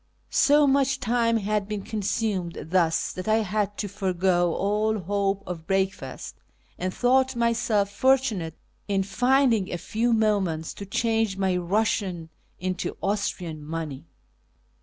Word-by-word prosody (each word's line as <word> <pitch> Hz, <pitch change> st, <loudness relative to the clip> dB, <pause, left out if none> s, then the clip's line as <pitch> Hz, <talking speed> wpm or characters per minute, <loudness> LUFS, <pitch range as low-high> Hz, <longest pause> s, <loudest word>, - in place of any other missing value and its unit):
So 295 Hz, +1 st, +5 dB
much 275 Hz, -1 st, +2 dB
time 230 Hz, 0 st, +2 dB
had 210 Hz, -1 st, -1 dB
been 210 Hz, -2 st, -4 dB
consumed 200 Hz, -4 st, -2 dB
thus 170 Hz, -3 st, +2 dB
that 185 Hz, +3 st, -6 dB
I 220 Hz, 0 st, +3 dB
had 205 Hz, 0 st, -1 dB
to 205 Hz, -, -2 dB
forego 185 Hz, -3 st, +1 dB
all 210 Hz, +2 st, +1 dB
hope 200 Hz, +1 st, -1 dB
of 165 Hz, -3 st, -7 dB
breakfast, 195 Hz, 0 st, -2 dB, 0.4 s
and 185 Hz, +1 st, -1 dB
thought 260 Hz, +4 st, +2 dB
myself 225 Hz, -3 st, +1 dB
fortunate 220 Hz, -8 st, +1 dB, 0.3 s
in 195 Hz, -2 st, +1 dB
finding 235 Hz, +1 st, +2 dB
a 175 Hz, -, -2 dB
few 225 Hz, +7 st, -1 dB
moments 200 Hz, -8 st, +1 dB
to 200 Hz, -, -8 dB
change 225 Hz, -1 st, 0 dB
my 190 Hz, -2 st, +1 dB
Eussian 180 Hz, -2 st, -1 dB, 0.3 s
into 185 Hz, +1 st, -3 dB
Austrian 180 Hz, -6 st, -2 dB
money. 155 Hz, -1 st, -5 dB
200 Hz, 130 wpm, -25 LUFS, 185-225 Hz, 0.4 s, So